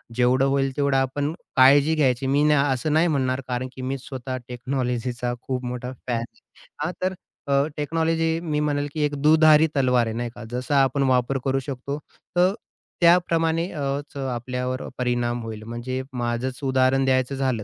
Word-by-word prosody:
जेवढं 125 +2 +3
होईल 135 0 +1
तेवढं 140 -2 +2
आपण 140 +3 0 0.2
काळजी 140 +3 +6
घ्यायची 135 -3 +1
मी 140 +2 +3
न 150 - +4
असं 140 +1 0
नाही 160 +3 +4
म्हणणार, 130 -4 0
कारण 125 0 -2
की 130 - -7
मी 130 +1 -2
स्वतः 130 0 -6
टेक्नॉलॉजीचा 125 -1 -2
खूप 130 -1 -3
मोठा 125 +1 -4 0.2
फॅन 120 -2 0
आहे. 115 - -9 0.4
हां, - - -1
तर 185 +1 0 0.3
अ, 140 0 +3
टेक्नॉलॉजी 165 +2 0
मी 155 -3 -2
म्हणेल 145 -1 0
की 155 - -2
एक 145 0 0
दुधारी 155 +1 +6
तलवार 125 -3 +3
आहे, 110 - -3
नाही 120 +1 -2
का. 120 - -9
जसा 130 +3 +1
आपण 135 +1 +1
वापर 130 +1 +2
करू 135 0 +1
शकतो 140 +1 -5 0.4
तर 180 +2 +4 0.5
त्याप्रमाणे 170 -1 +3
अ, 150 -4 -4 0.3
च - - -9
आपल्यावर 125 +1 -3 0.2
परिणाम 120 -1 -1
होईल. 110 -1 -7
म्हणजे 120 +3 -4
माझंच 125 +2 -2
उदाहरण 130 0 +2
द्यायचं 130 +1 +1
झालं 130 -5 -1
135 Hz, 170 wpm, -24 LUFS, 125-145 Hz, 0.5 s, काळजी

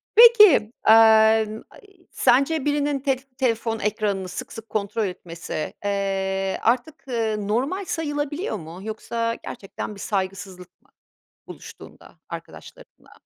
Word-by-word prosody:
Peki, 425 - +7 0.2
emm, 220 0 +5
ay, - - -17 0.3
sence 275 +4 +2
birinin 290 -1 0
telf 270 -1 -3
telefon 225 -3 -1
ekranını 205 -2 -2
sık 180 - -7
sık 225 0 -10
kontrol 210 +1 -2
etmesi, 170 -4 -6
eee, 195 -1 -1
artık 255 +6 -1 0.3
normal 260 - -2
sayılabiliyor 295 - -3
mu? 165 0 -10
Yoksa 230 +1 -3
gerçekten 210 -1 -7
bir - - -13
saygısızlık 190 -2 -5
mı - - -32 0.6
buluştuğunda - - -13
arkadaşlarınla? - - -12
220 Hz, 110 wpm, -23 LUFS, 195-275 Hz, 0.6 s, Peki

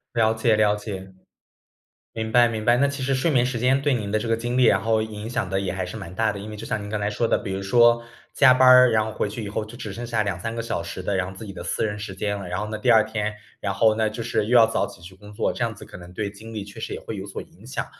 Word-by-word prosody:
了 110 -1 +3
解 110 0 +2
了 105 -1 +3
解， 95 -3 -7 1.0
明 110 0 -4
白 120 0 +6
明 110 -1 -4
白。 120 +2 +4
那 140 +2 +3
其 140 -1 -5
实 135 +1 +1
睡 135 +6 +1
眠 125 -5 +3
时 125 -1 -2
间 130 +3 +2
对 145 0 +2
您 105 -5 -2
的 110 - +1
这 110 - -4
个 115 - +2
精 120 +2 -3
力 130 - +4
然 100 -4 +5
后 110 +1 +1
影 110 0 -6
响 115 -5 -2
得 95 0 0
也 95 - -2
还 95 0 -3
是 90 - -7
蛮 85 +2 -9
大 110 +2 +1
的。 100 - -7
因 100 +2 -8
为 105 - -7
就 105 - -8
像 110 -1 -2
您 105 - -7
刚 105 +1 -2
才 105 0 -1
说 115 +2 0
的， - - +3
比 95 - -5
如 95 - -3
说 120 +3 +4 0.3
加 130 - +6
班 130 0 +5
儿， 125 -1 +8
然 110 -1 +2
后 110 - -5
回 105 - -1
去 110 +2 -6
以 - - -5
后 105 +1 -3
就 115 +3 -11
只 105 -3 -6
剩 120 +4 -6
下 115 -2 0
2，3 100 +2 -3
个 115 - -2
小 110 -6 -3
时 85 +2 -6
的 100 - -1
然 95 -1 -1
后 95 - -12
自 110 - -8
己 100 - -8
的 95 - -8
私 85 - -2
人 105 -1 -2
时 105 -2 -6
间 100 +2 -2
了， 95 -2 -7
然 90 0 -3
后 105 - -3
呢 110 - -4
第 120 +3 +2
2 110 -2 +6
天， 105 -1 -3 0.3
然 100 -1 -2
后 110 +3 +4
呢， 110 0 +1
就 110 +2 -5
是 115 -2 -1
又 125 +3 +3
要 115 -1 +8
早 115 - 0
起 100 -4 -14
去 90 +2 -11
工 105 +2 -14
作， 110 - 0
这 - - -4
样 115 -1 -1
子 105 - -12
可 - - -11
能 90 0 -12
对 100 +1 -3
精 110 +3 -11
力 105 -2 -4
确 100 0 -11
实 - - -4
也 - - -6
会 - - -6
有 - - -6
所 - - -6
影 - - -18
响。 - - -4
110 Hz, 350 characters per minute, -24 LUFS, 100-115 Hz, 1.0 s, 儿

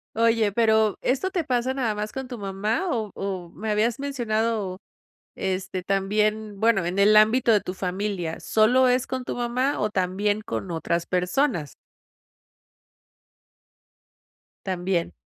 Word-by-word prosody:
Oye, 225 -2 +3
pero 220 -1 +2
¿esto 275 +9 0
te 350 -3 -1
pasa 250 -1 0
nada 250 -5 -1
más 210 +1 -4
con 265 -1 -5
tu 245 -1 -7
mamá? 205 - -2
O 220 -5 -2
o 190 -3 -4
me 215 +5 -5
habías 225 +4 +1
mencionado, 225 -7 -1 0.6
este, 185 -1 -3
también 210 +1 0
bueno, 225 -4 +3
en 175 +3 -3
el 205 +2 +5
ámbito 225 +3 +5
de 210 - +4
tu 180 - -6
familia. 185 -2 -3
¿Solo 250 +4 +3
es 250 0 +2
con 260 -1 -4
tu - - -4
mamá, 245 +3 0
o 210 0 0
también 200 +2 0
con 175 - -5
otras 170 +1 -1
personas? 180 - 0 2.9
También. 180 -2 -1
215 Hz, 140 wpm, -25 LUFS, 190-235 Hz, 2.9 s, el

